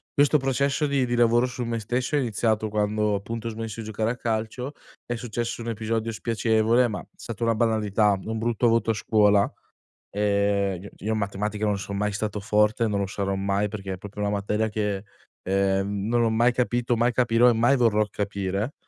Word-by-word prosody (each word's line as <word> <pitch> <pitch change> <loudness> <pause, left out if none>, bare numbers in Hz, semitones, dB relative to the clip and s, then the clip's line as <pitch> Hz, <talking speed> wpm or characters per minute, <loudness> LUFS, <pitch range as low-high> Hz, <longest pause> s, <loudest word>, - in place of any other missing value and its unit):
Questo 145 +1 +4
processo 140 +3 0
di 140 -2 +1
di 120 - -3
lavoro 120 +1 +4
su 125 0 -4
me 115 0 -2
stesso 125 +6 -1
è - - +3
iniziato 110 -2 0
quando 105 0 0
appunto 115 +3 -4
ho - - -1
smesso 115 0 -6
di 110 - -5
giocare 110 +1 -1
a - - -3
calcio, 115 +5 -3 0.3
è 120 - -3
successo 115 0 -4
un 115 - -4
episodio 115 +1 -2
spiacevole, 115 +2 +2
ma 105 -4 -4
è - - -14
stata 115 0 -6
una 115 0 +3
banalità, 110 -2 +2
un 110 0 -3
brutto 120 +1 +1
voto 115 -1 +2
a - - 0
scuola, 105 -2 +3 0.6
ehm 100 -2 +1
cioè 100 - -9
io 110 - 0
in 110 - 0
matematica 105 +1 -2
non 105 -2 +1
son 100 +1 -5
mai 105 +1 0
stato 105 0 -3
forte, 105 +2 +2
non 100 -1 -1
lo 100 - 0
sarò 100 0 -2
mai, 100 +1 0
perché 100 -2 -6
è - - -4
proprio 105 +1 -9
una 100 - 0
materia 105 +2 0
che, 105 -2 -2 0.4
ehm, 100 +1 0
non 120 0 +2
ho 115 - +2
mai 120 +2 +3
capito, 120 -1 0
mai 120 +2 +2
capirò 120 0 +4
e - - +6
mai 120 +5 +3
vorrò 110 -3 +3
capire. 100 +4 -2
110 Hz, 205 wpm, -25 LUFS, 105-120 Hz, 0.6 s, e